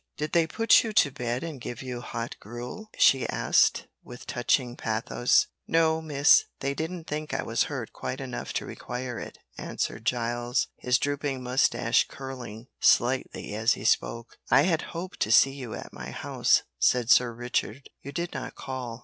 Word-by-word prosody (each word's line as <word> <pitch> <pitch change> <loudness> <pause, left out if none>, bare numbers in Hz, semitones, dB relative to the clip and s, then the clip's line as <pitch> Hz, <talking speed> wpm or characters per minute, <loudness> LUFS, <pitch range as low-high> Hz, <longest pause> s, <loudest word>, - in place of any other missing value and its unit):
"Did 150 0 -3
they 165 -1 +3
put 225 +7 +4
you 220 -2 -4
to 145 -9 +4
bed 120 +1 -3
and 155 -6 -6
give 120 +1 -6
you 125 -2 -5
hot 115 -1 -5
gruel?" 120 - -8
she 135 -2 +4
asked, - - +2 0.2
with 125 0 -11
touching 120 -1 0
pathos. 115 +2 +1 0.2
"No, 160 -1 +2
miss, 155 - +5
they 140 0 -1
didn't 160 +3 -5
think 150 0 -4
I - - -1
was - - +1
hurt - - -5
quite - - -5
enough - - -5
to - - -2
require 125 -1 -5
it," - - -8 0.2
answered - - -4
Giles, 120 +1 0
his 125 0 +2
drooping 145 -2 -2
moustache 125 +1 +2
curling 125 -5 -8
slightly 125 -3 +2
as 110 +3 +2
he 100 - -8
spoke. 115 +1 0
"I 140 - +6
had 165 -2 +2 0.2
hoped 180 +2 -6
to 110 - 0
see 135 +3 +6
you 130 -5 -7
at - - -9
my - - -7
house," - - +1 0.2
said 125 -2 +3
Sir 125 -1 +5
Richard, 120 +1 -3
"you 140 - -8
did 170 +4 -4
not - - -6
call." 125 -3 -6
125 Hz, 175 wpm, -27 LUFS, 120-150 Hz, 0.2 s, I